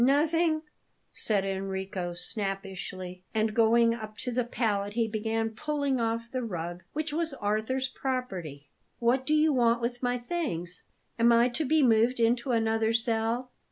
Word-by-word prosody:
"Nothing," 310 +4 +3 0.5
said 200 -3 +1
Enrico 190 -2 -3
snappishly; 185 -2 -4
and, 215 0 +1
going 230 +1 +4
up 215 -2 -7
to 250 - -2
the 250 +1 +1
pallet, 205 -4 -1
he 230 0 +1
began 225 +1 -1
pulling 285 +2 -1
off 230 +1 -2
the 255 - -2
rug, 175 -5 -4
which 305 0 -2
was 320 -2 0
Arthur's 220 +4 -1
property. 190 - -4 0.3
"What 255 +3 +1
do 305 - +3
you 305 0 +4
want 235 -2 +3
with 240 +1 -3
my 245 -1 +1
things? 240 - -4 0.4
Am 235 +1 +6
I 235 +1 +5
to 300 +6 -1
be 310 +2 +3
moved 235 +1 +4
into 235 +3 +2
another 225 -1 +2
cell?" 230 +2 0
230 Hz, 155 wpm, -29 LUFS, 205-255 Hz, 0.5 s, Am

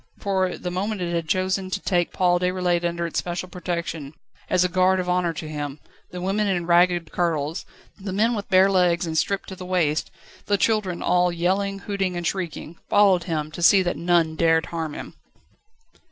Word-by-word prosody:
For 190 -2 0
the 180 - -5
moment 200 +3 -2
it 175 -1 -2
had 165 -1 -2
chosen 185 +1 0
to 190 - -2
take 175 -3 0
Paul 175 -1 +2
Déroulède 180 -1 0
under 170 0 -1
its 170 - -2
special 175 +1 -4
protection, 170 -4 -4
and 140 - -12 0.4
as 180 -1 +3
a - - +3
guard 185 +1 +2
of 180 - -3
honour 180 -1 +1
to 155 0 -6
him 145 -1 -5 0.3
the 180 - -7
women 195 +3 0
in 180 -3 0
ragged 175 -1 +3
kirtles, 165 -2 -1 0.3
the 195 0 -5
men 220 +5 +2
with 205 -3 -4
bare 190 +1 +5
legs 180 -2 +2
and 160 -1 -4
stripped 195 +4 -1
to 190 - -7
the 185 - -9
waist, 175 -4 0 0.4
the 205 - +2
children 205 -5 0
all 180 0 +3
yelling, 190 +4 0
hooting, 190 -2 -2
and 175 - -4
shrieking 170 -2 -4
followed 195 -4 +4
him, 155 -3 -3
to 175 - -7
see 190 +2 +6
that 175 - -1
none 170 -2 +1
dared 165 0 +3
harm 160 -3 -3
him. - - -8
180 Hz, 195 wpm, -23 LUFS, 170-190 Hz, 0.4 s, see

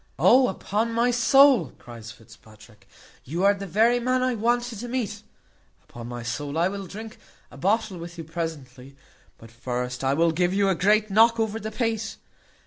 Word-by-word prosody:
"O! 255 +1 +5
upon 215 +4 -2
my 235 +2 +2
soul," 245 - +4
cries 115 -2 -11
Fitzpatrick, 110 -1 -18 0.4
"you 170 +7 -3
are 200 +1 +5
the 200 0 -7
very 230 +6 +3
man 255 +1 0
I 255 0 +1
wanted 240 0 -1
to 245 - -6
meet. 225 -4 -3 0.6
Upon 120 -1 -10
my 120 -1 -7
soul 140 +5 -4
I 170 +3 +2
will 195 -1 -6
drink 220 +4 -10 0.3
a - - -13
bottle 200 +3 0
with 170 +1 -9
you 165 - -6
presently; 145 -5 -7 0.4
but 115 0 -15
first 125 +2 -5
I 135 +1 +1
will 165 +2 +3
give 175 +3 0
you 200 -1 +2
a - - +3
great 210 +4 +2
knock 225 +3 +4
over 220 0 -1
the 220 - -5
pate. 225 -1 -3
195 Hz, 180 wpm, -24 LUFS, 140-225 Hz, 0.6 s, O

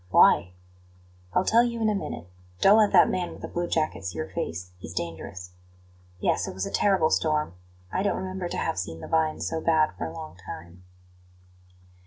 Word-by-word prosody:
"Why?" 90 0 +5 0.8
"I'll 185 - +3
tell 230 +2 +5
you 235 -1 -2
in 220 - +2
a 215 - +3
minute. 195 - -4 0.3
Don't 205 +3 +7
let 210 -2 +4
that 180 -3 +7
man 180 -1 -1
with - - -11
the - - -3
blue 175 0 -2
jacket 155 - -1
see 90 -2 -5
your 80 0 -3
face; 90 +2 -4
he's 85 -1 -9
dangerous. 85 +2 -5 0.7
Yes; - - +1
it - - -6
was 95 - -2
a - - -5
terrible 190 -6 +3
storm; 150 - +1 0.4
I 185 - 0
don't 200 - +1
remember 185 -1 -4
to - - -4
have 95 - -1
seen 80 -3 -5
the - - -7
vines 160 -1 +1
so 160 -1 -2
bad 160 -2 +3
for - - -2
a - - -7
long 85 +1 -9
time." 90 -1 -10
155 Hz, 200 wpm, -26 LUFS, -, 0.8 s, Don't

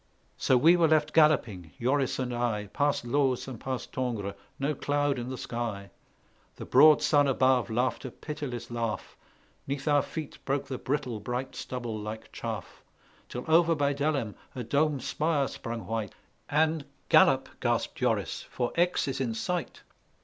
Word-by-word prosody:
So 130 - +3
we 165 +7 +6
were 170 -2 +4
left 155 -1 +2
galloping, 110 - +3
Joris 130 +2 +1
and 125 -2 -2
I, 115 -4 -1
Past 145 -3 +1
Looz 130 0 +1
and 125 -4 -7
past 130 -2 -5
Tongres, 115 -6 -2 0.2
no 140 +2 0
cloud 145 -1 0
in 120 +1 -5
the 130 - -4
sky; 115 -6 -4 0.6
The - - -8
broad 155 -1 +6
sun 145 -2 +4
above 130 -2 +3
laughed 125 +3 0
a - - -3
pitiless 140 -4 -6
laugh; 115 -2 -3 0.5
'Neath 135 +1 -3
our 145 -1 +5
feet 155 0 -7
broke 140 0 -1
the 130 - -5
brittle 130 -5 -2
bright 125 +5 -4
stubble 120 -3 -4
like 105 +1 -7
chaff; - - -6 0.5
Till 125 - -5
over 165 +1 +5
by 145 -1 +1
Delhem 140 -6 -1 0.2
a 125 - -3
dome 145 +4 +1
spire 150 +2 0
sprung 115 -1 -6
white, 110 -3 -3 0.3
And 155 +1 +2 0.3
"Gallop," - - +5
gasped - - 0
Joris, - - 0
"for 120 -1 -2
Aix 175 -2 +2
is 135 0 -2
in 115 -4 -1
sight! 175 +10 -3
130 Hz, 160 wpm, -29 LUFS, 120-145 Hz, 0.6 s, we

